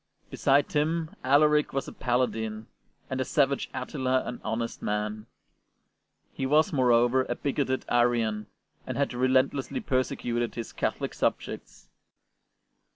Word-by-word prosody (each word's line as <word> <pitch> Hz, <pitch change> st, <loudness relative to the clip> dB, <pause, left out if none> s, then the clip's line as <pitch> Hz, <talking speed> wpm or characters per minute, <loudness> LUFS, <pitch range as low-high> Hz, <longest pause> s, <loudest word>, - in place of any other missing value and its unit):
Beside 140 Hz, +1 st, +2 dB
him 160 Hz, +2 st, 0 dB
Alaric 150 Hz, +2 st, +4 dB
was 135 Hz, -, -2 dB
a -, -, -8 dB
paladin, 110 Hz, -3 st, -1 dB, 0.4 s
and 130 Hz, -, -3 dB
the -, -, +2 dB
savage 140 Hz, 0 st, +1 dB
Attila 130 Hz, 0 st, -1 dB
an 125 Hz, -, -6 dB
honest 115 Hz, +1 st, -3 dB
man. 105 Hz, +1 st, -2 dB, 1.1 s
He 135 Hz, -, -2 dB
was, 150 Hz, +3 st, +3 dB
moreover, 125 Hz, -1 st, +3 dB
a 120 Hz, -, -2 dB
bigoted 135 Hz, -1 st, -1 dB
Arian, 115 Hz, -3 st, +1 dB, 0.4 s
and -, -, -3 dB
had 140 Hz, -2 st, 0 dB
relentlessly 130 Hz, -, +1 dB
perse 130 Hz, -, 0 dB
cuted 120 Hz, -1 st, -2 dB
his 115 Hz, -, -6 dB
Catholic -, -, -2 dB
subjects. -, -, -3 dB
130 Hz, 125 wpm, -28 LUFS, 120-140 Hz, 1.1 s, Alaric